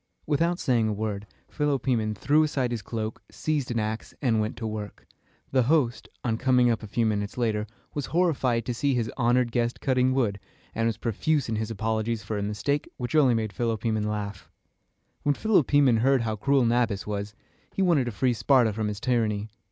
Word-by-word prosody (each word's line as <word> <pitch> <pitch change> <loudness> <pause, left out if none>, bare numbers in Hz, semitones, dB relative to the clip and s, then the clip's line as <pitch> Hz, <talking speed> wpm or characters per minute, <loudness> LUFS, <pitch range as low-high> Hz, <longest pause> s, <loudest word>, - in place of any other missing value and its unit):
Without 165 +4 +1
saying 120 -9 +1
a 110 - 0
word, 105 -1 -3 0.2
Philopoemen 130 -7 0
threw 145 +9 +3
aside 135 -5 0
his 115 -3 -2
cloak, 110 0 -4
seized 150 -4 -2
an 120 - -2
ax, 110 0 -3
and 115 -6 +2
set 105 - -4
to 115 - -6
work. 105 -1 -6 0.5
The 130 - +4
host, 140 -7 +1
on 115 -2 -1
coming 125 -2 +4
up 115 - -1
a 110 - -7
few 115 +3 0
minutes 105 -1 -1
later, 110 -3 0 0.3
was 145 -3 -3
horrified 135 -9 +1
to 125 - -2
see 135 +3 0
his 115 -2 -1
honored 120 -1 +2
guest 120 0 0
cutting 130 -1 +2
wood, 105 -7 0 0.3
and 115 0 0
was 115 -3 -1
profuse 130 +5 0
in 110 - -1
his 110 0 -2
apologies 110 0 -1
for 105 +1 -3
a - - -2
mistake 105 +8 -1
which 125 +2 -4
only 135 -6 +5
made 110 -2 -2
Philopoemen 110 -3 -1
laugh. 105 -2 -5 0.7
When 145 -1 +1
Philopoemen 145 - +3
heard 130 +2 +3
how 110 -1 -1
cruel 135 +4 +2
Nabis 115 -4 +1
was, 105 0 -4 0.4
he 195 - 0
wanted 165 -8 +3
to 120 - -3
free 120 +5 +1
Sparta 120 -2 +3
from 110 0 -2
his 105 -1 -4
tyranny. 110 -4 0
115 Hz, 190 wpm, -26 LUFS, 110-130 Hz, 0.7 s, only